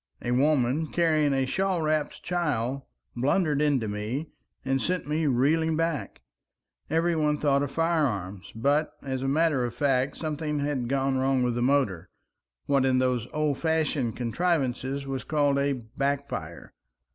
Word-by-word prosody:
A 120 Hz, -, -1 dB
woman, 140 Hz, +2 st, +2 dB
carrying 155 Hz, -3 st, +2 dB
a 135 Hz, -1 st, +1 dB
shawl 185 Hz, +4 st, 0 dB
wrapped 155 Hz, -1 st, -1 dB
child, 140 Hz, -7 st, -1 dB, 0.3 s
blundered 145 Hz, +4 st, +1 dB
into 140 Hz, -7 st, +2 dB
me, 110 Hz, +9 st, -4 dB, 0.3 s
and 135 Hz, 0 st, +1 dB
sent 180 Hz, -2 st, -1 dB
me 155 Hz, +1 st, 0 dB
reeling 155 Hz, +5 st, +2 dB
back. 165 Hz, -, -2 dB, 0.7 s
Every 165 Hz, +2 st, +2 dB
one 150 Hz, -1 st, +1 dB
thought 140 Hz, -2 st, +2 dB
of 145 Hz, -, -1 dB
firearms, 135 Hz, -, -1 dB
but, 145 Hz, +7 st, +1 dB
as 130 Hz, -2 st, -3 dB
a 135 Hz, -, -1 dB
matter 150 Hz, -2 st, +2 dB
of 120 Hz, -1 st, -3 dB
fact, 135 Hz, 0 st, +1 dB
something 150 Hz, -1 st, -3 dB
had 140 Hz, -4 st, -1 dB
gone 135 Hz, -1 st, +1 dB
wrong 130 Hz, -1 st, +2 dB
with 125 Hz, -1 st, +1 dB
the 120 Hz, -, -2 dB
motor, 120 Hz, -10 st, +1 dB, 0.6 s
what 140 Hz, -2 st, +2 dB
in 130 Hz, -1 st, +3 dB
those 125 Hz, -2 st, +1 dB
old 150 Hz, -2 st, 0 dB
fashioned 155 Hz, -7 st, 0 dB
contrivances 135 Hz, 0 st, -1 dB
was 135 Hz, -1 st, -4 dB
called 145 Hz, -2 st, +1 dB
a 140 Hz, 0 st, +1 dB
backfire. 140 Hz, +4 st, -4 dB
140 Hz, 150 wpm, -27 LUFS, 130-155 Hz, 0.7 s, in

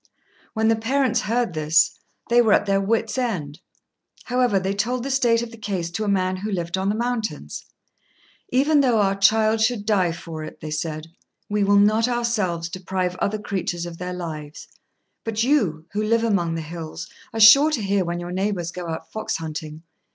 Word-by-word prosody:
When 220 Hz, 0 st, +2 dB
the 225 Hz, -, +4 dB
parents 250 Hz, +1 st, +1 dB
heard 235 Hz, -3 st, -1 dB
this, 155 Hz, +1 st, +2 dB, 0.3 s
they 240 Hz, +1 st, +5 dB
were 220 Hz, -3 st, +4 dB
at -, -, +3 dB
their 195 Hz, -1 st, +2 dB
wits' 225 Hz, +5 st, 0 dB
end. 170 Hz, -, -3 dB, 0.6 s
However, 245 Hz, -5 st, +1 dB
they 190 Hz, +1 st, -2 dB
told 235 Hz, +5 st, -1 dB
the 275 Hz, -, -3 dB
state 235 Hz, -3 st, +2 dB
of 235 Hz, -, -7 dB
the 230 Hz, -, -12 dB
case 185 Hz, -5 st, -3 dB
to 215 Hz, +5 st, -3 dB
a -, -, -3 dB
man 185 Hz, -2 st, +1 dB
who 210 Hz, +3 st, -4 dB
lived 175 Hz, -2 st, -2 dB
on 190 Hz, +1 st, -1 dB
the 210 Hz, -, 0 dB
mountains. 220 Hz, -, -3 dB, 0.8 s
"Even 285 Hz, +3 st, +3 dB
though 245 Hz, -5 st, +3 dB
our 195 Hz, -1 st, +3 dB
child 215 Hz, +2 st, +3 dB
should 220 Hz, -2 st, +1 dB
die 195 Hz, -5 st, +2 dB
for 165 Hz, -1 st, -7 dB
it," 155 Hz, -, -9 dB
they 155 Hz, -, -7 dB
said, 155 Hz, 0 st, -3 dB, 0.4 s
"we 205 Hz, 0 st, +1 dB
will 200 Hz, 0 st, +4 dB
not 215 Hz, +3 st, +4 dB
ourselves 220 Hz, -9 st, -1 dB
deprive 185 Hz, +1 st, -3 dB
other 205 Hz, +3 st, -1 dB
creatures 185 Hz, -4 st, -3 dB
of 170 Hz, -1 st, -8 dB
their 180 Hz, 0 st, -4 dB
lives; 155 Hz, -4 st, -7 dB, 0.6 s
but 225 Hz, 0 st, -1 dB
you, 205 Hz, -, +1 dB
who 210 Hz, -, -1 dB
live 230 Hz, +1 st, +2 dB
among 175 Hz, -7 st, +1 dB
the 165 Hz, -, -3 dB
hills, 160 Hz, 0 st, -7 dB, 0.2 s
are 225 Hz, -, -4 dB
sure 275 Hz, +8 st, +8 dB
to 300 Hz, -7 st, -1 dB
hear 195 Hz, -1 st, +1 dB
when 175 Hz, 0 st, -3 dB
your 175 Hz, 0 st, -6 dB
neighbours 185 Hz, -2 st, -2 dB
go 175 Hz, -1 st, -6 dB
out 160 Hz, -, -6 dB
fox 220 Hz, -, -3 dB
hunting. 155 Hz, -1 st, -7 dB
200 Hz, 195 wpm, -23 LUFS, 170-225 Hz, 0.8 s, sure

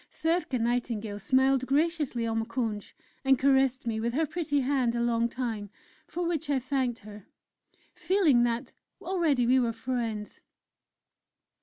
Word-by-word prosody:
Circé 325 Hz, -6 st, -1 dB
Nightingale 230 Hz, -3 st, -1 dB
smiled 260 Hz, +3 st, +2 dB
graciously 290 Hz, -4 st, 0 dB
on 225 Hz, 0 st, 0 dB
Moukounj, 225 Hz, -2 st, -3 dB, 0.3 s
and 270 Hz, -1 st, +4 dB
caressed 265 Hz, -1 st, +2 dB
me 225 Hz, -2 st, -1 dB
with 235 Hz, +1 st, -1 dB
her 320 Hz, +2 st, +2 dB
pretty 300 Hz, -2 st, -1 dB
hand 255 Hz, -3 st, +1 dB
a -, -, -1 dB
long 235 Hz, 0 st, +1 dB
time 230 Hz, -5 st, -4 dB, 0.4 s
for 350 Hz, 0 st, -3 dB
which 320 Hz, -3 st, -2 dB
I 285 Hz, -, +2 dB
thanked 260 Hz, -2 st, -1 dB
her, 210 Hz, -1 st, -12 dB, 0.7 s
feeling 350 Hz, -10 st, +3 dB
that 240 Hz, +1 st, -1 dB, 0.3 s
already 335 Hz, -9 st, +1 dB
we 255 Hz, +2 st, +4 dB
were 235 Hz, -2 st, 0 dB
friends. 225 Hz, -3 st, -4 dB
250 Hz, 140 wpm, -28 LUFS, 230-280 Hz, 0.7 s, and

